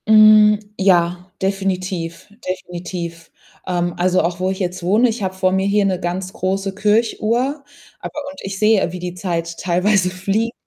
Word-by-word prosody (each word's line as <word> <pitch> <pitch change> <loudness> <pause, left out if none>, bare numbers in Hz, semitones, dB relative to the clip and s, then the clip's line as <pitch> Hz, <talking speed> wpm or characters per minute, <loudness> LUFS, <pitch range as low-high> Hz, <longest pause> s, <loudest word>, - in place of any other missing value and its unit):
Hm, 215 -1 +7 0.2
ja, 180 -1 +2
definitiv, 185 -3 -2 0.2
definitiv. 175 -2 -6 0.4
Ähm, 175 -1 -1
also, 180 +1 +2
auch 170 +1 -2
wo 185 0 0
ich 190 - -2
jetzt 180 -1 -3
wohne 210 +8 +3
ich 225 0 -4
habe 190 -1 -2
vor 185 0 +1
mir 190 +1 +1
hier 200 0 +2
'ne 185 -2 0
ganz 180 +1 -3
große 195 +1 -2
Kirchuhr, 230 +6 0 0.4
aber - - -6
und 285 - -13
ich 195 0 -5
sehe, 210 -4 +3
wie 180 - -6
die 180 0 -5
Zeit 170 -2 -3
teilweise 185 +1 +2
fliegt. 195 +5 -1
190 Hz, 165 wpm, -19 LUFS, 180-210 Hz, 0.4 s, Hm